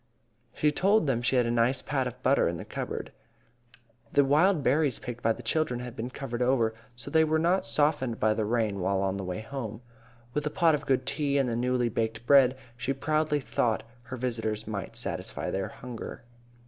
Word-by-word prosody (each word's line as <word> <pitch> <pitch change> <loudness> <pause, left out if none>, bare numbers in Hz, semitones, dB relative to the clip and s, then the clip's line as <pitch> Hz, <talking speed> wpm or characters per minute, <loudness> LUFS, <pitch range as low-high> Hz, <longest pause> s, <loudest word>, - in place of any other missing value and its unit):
She 150 - +2
told 195 +5 +3
them 130 -4 +1
she 120 +2 +1
had 125 -1 +4
a 115 - 0
nice 120 +3 +2
pat 135 -3 -1
of 125 - -9
butter 135 +2 +4
in 85 0 -2
the - - -7
cupboard. - - -5 1.0
The 140 - +4
wild 155 +4 +3
berries 140 -1 +2
picked 125 -2 -7
by 115 - +2
the 120 - -4
children 125 +1 0
had 125 -1 -7
been 120 +1 -4
covered 125 -2 -5
over, 120 -3 +2 0.2
so 120 - -9
they 160 -1 +5
were 160 0 +2
not 170 -3 +1
softened 130 -2 +1
by 110 0 +3
the 110 - -1
rain 110 -2 0
while 95 +1 0
on 95 0 -1
the 100 - -4
way 90 +2 -4
home. 115 -1 -6 0.5
With 150 +1 -1
a - - +1
pot 165 +1 +3
of 145 -1 -2
good 130 -1 +2
tea 140 -1 0
and 135 -2 +2
the 115 - -1
newly 125 0 +1
baked 115 0 -2
bread, 135 -1 +6 0.2
she 130 +3 -2
proudly 155 +2 0
thought 115 -1 0 0.2
her 130 +2 -7
visitors 115 -3 -2
might 105 -3 -5
satisfy - - -1
their 95 0 -2
hunger. 120 -2 -8
125 Hz, 205 wpm, -28 LUFS, 115-145 Hz, 1.0 s, bread